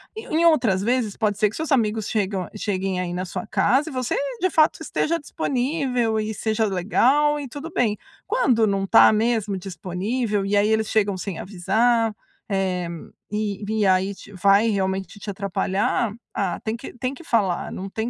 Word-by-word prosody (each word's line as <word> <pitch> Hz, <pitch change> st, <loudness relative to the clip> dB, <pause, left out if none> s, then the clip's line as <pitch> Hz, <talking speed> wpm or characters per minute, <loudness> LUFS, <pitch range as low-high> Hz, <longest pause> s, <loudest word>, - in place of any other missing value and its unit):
Em 440 Hz, -, -7 dB, 0.2 s
em 340 Hz, -, +4 dB
outras 240 Hz, -, +3 dB
vezes, 230 Hz, -2 st, 0 dB
pode 210 Hz, -3 st, 0 dB
ser 210 Hz, -1 st, +3 dB
que -, -, -10 dB
seus 320 Hz, -1 st, -4 dB
amigos 220 Hz, -4 st, +1 dB
chegam 195 Hz, -4 st, -1 dB
cheguem 195 Hz, -3 st, -2 dB
aí 175 Hz, -1 st, -3 dB
na 180 Hz, +1 st, -3 dB
sua 190 Hz, +5 st, -5 dB
casa 270 Hz, +8 st, +2 dB
e 285 Hz, -, -9 dB
você, 255 Hz, -2 st, -1 dB, 0.2 s
de 370 Hz, -, +2 dB
fato, 310 Hz, 0 st, +3 dB
esteja 330 Hz, +1 st, -1 dB
disponível 250 Hz, -5 st, -1 dB
e 215 Hz, 0 st, -2 dB
seja 220 Hz, +1 st, 0 dB
legal 255 Hz, +10 st, +2 dB
e 280 Hz, -, -5 dB
tudo 295 Hz, +5 st, -7 dB
bem. 215 Hz, -4 st, +1 dB, 0.3 s
Quando 265 Hz, -, +2 dB
não 195 Hz, -2 st, 0 dB
está 225 Hz, -, +7 dB
mesmo 215 Hz, -3 st, 0 dB
disponível, 195 Hz, +4 st, -2 dB
e 205 Hz, +1 st, 0 dB
aí 205 Hz, +1 st, +3 dB
eles 220 Hz, 0 st, +1 dB
chegam 205 Hz, -3 st, +1 dB
sem 185 Hz, -2 st, -5 dB
avisar, 220 Hz, +4 st, +1 dB, 0.3 s
eh, 185 Hz, -3 st, -1 dB, 0.4 s
e 210 Hz, -1 st, -2 dB
e 215 Hz, -1 st, +1 dB
aí 190 Hz, +1 st, +2 dB
te 200 Hz, -, -14 dB
vai 200 Hz, +4 st, +4 dB
realmente 190 Hz, 0 st, -2 dB
te 205 Hz, -, -7 dB
atrapalhar, 200 Hz, +2 st, -1 dB, 0.2 s
ah, 185 Hz, -4 st, -1 dB
tem 220 Hz, 0 st, -2 dB
que 235 Hz, -, -9 dB
tem 255 Hz, +2 st, -2 dB
que 335 Hz, -, -12 dB
falar, 200 Hz, -, 0 dB
não 195 Hz, +1 st, -6 dB
tem 220 Hz, +4 st, -3 dB
215 Hz, 180 wpm, -23 LUFS, 195-245 Hz, 0.4 s, está